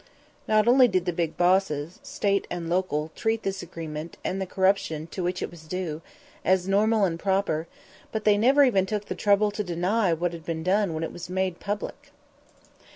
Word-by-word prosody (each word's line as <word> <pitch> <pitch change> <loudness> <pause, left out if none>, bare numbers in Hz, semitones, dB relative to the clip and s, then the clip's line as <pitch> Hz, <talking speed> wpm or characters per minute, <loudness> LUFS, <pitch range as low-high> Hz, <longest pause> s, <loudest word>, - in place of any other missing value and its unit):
Not 215 0 +3
only 250 +1 +7
did 185 -5 0
the 180 - -1
big 165 -1 -2
bosses, 175 -3 +1
State 270 -9 -1
and 175 -1 -4
local, 165 -3 -1
treat 225 0 -1
this 195 0 -2
agreement, 165 -2 -7
and 190 +1 -1
the 190 - -2
corruption 190 -5 +1
to 185 - -4
which 180 +1 -2
it - - -4
was 160 -2 -14
due, 165 -3 -4 0.4
as 185 0 +2
normal 210 +2 +3
and 165 -3 -2
proper, 190 -5 0 0.4
but 220 -1 -3
they 210 -1 +5
never 270 +6 +5
even 195 -8 +3
took 210 0 -2
the - - -4
trouble 205 0 +3
to 210 +1 -3
deny 180 +3 +1
what 170 +1 -1
had 165 -1 -8
been 160 0 -4
done 190 -1 +1
when 160 - -3
it - - -4
was 175 0 -8
made 185 -1 -1
public. 205 +1 -5
185 Hz, 195 wpm, -26 LUFS, 170-205 Hz, 0.4 s, only